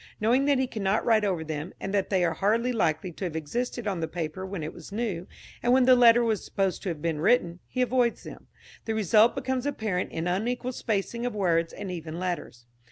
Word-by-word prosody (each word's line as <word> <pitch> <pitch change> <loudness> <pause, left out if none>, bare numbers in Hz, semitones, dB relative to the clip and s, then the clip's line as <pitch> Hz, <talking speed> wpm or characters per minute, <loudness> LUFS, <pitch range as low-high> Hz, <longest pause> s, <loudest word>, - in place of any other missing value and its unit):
Knowing 245 +6 +3
that 285 -1 +3
he 260 - +2
cannot 210 -4 -1
write 220 -2 +4
over 185 -5 0
them, 155 +2 -5
and 195 - -4
that 200 -2 +1
they 190 -3 +2
are 165 - +1
hardly 230 +5 +1
likely 170 -4 0
to 175 - -8
have 170 -4 -3
existed 235 +10 -3
on 195 -4 -1
the 160 - -2
paper 170 +2 -4
when 190 -4 -5
it 155 - -5
was 170 +2 -12
new, 200 -5 -3 0.3
and 240 +1 +3
when 260 -1 +5
the 255 0 +7
letter 240 -1 +6
was 220 -3 0
supposed 195 -2 -1
to 180 -5 -2
be 165 +2 -2
written, 170 +2 +2
he 255 - 0
avoids 245 -1 +1
them. - - -11 0.4
The 225 - -1
result 215 +2 +4
becomes 260 +1 -2
apparent 215 -10 -2
in 165 +1 -3
unequal 240 +7 -1
spacing 235 0 -2
of 245 -3 -2
words 170 -4 +1
and 195 - -6
even 165 -2 -6
letters. 175 -9 -4
200 Hz, 220 wpm, -27 LUFS, 170-240 Hz, 0.4 s, the